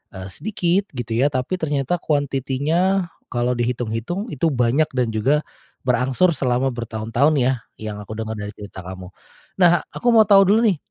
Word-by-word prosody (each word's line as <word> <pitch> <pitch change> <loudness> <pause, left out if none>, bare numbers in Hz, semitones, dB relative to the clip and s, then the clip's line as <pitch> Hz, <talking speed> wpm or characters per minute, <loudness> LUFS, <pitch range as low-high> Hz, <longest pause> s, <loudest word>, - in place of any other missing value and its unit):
eee, 95 0 -7
sedikit, 195 -2 -1
gitu 120 -2 -5
ya, 135 - +4
tapi 145 +6 -2
ternyata 145 +2 -1
quantity-nya 150 +6 0 0.2
kalau 120 0 -1
dihitung-hitung 120 - -3
itu 150 +3 0
banyak 125 +4 +2
dan 125 -3 +1
juga 135 +8 +1 0.4
berangsur 130 +8 +2
selama 130 0 +1
bertahun-tahun 115 +5 0
ya, 130 +1 +3 0.3
yang 110 -1 -5
aku 100 - -12
denger 110 0 -4
dari 105 0 -5
cerita 100 -3 -10
kamu. 95 0 -8 0.5
Nah, 175 -1 +6
aku 245 - -4
mau 220 -2 +6
tahu 200 -1 +7
dulu 220 - +5
nih, 185 - +2
130 Hz, 160 wpm, -21 LUFS, 115-170 Hz, 0.5 s, tahu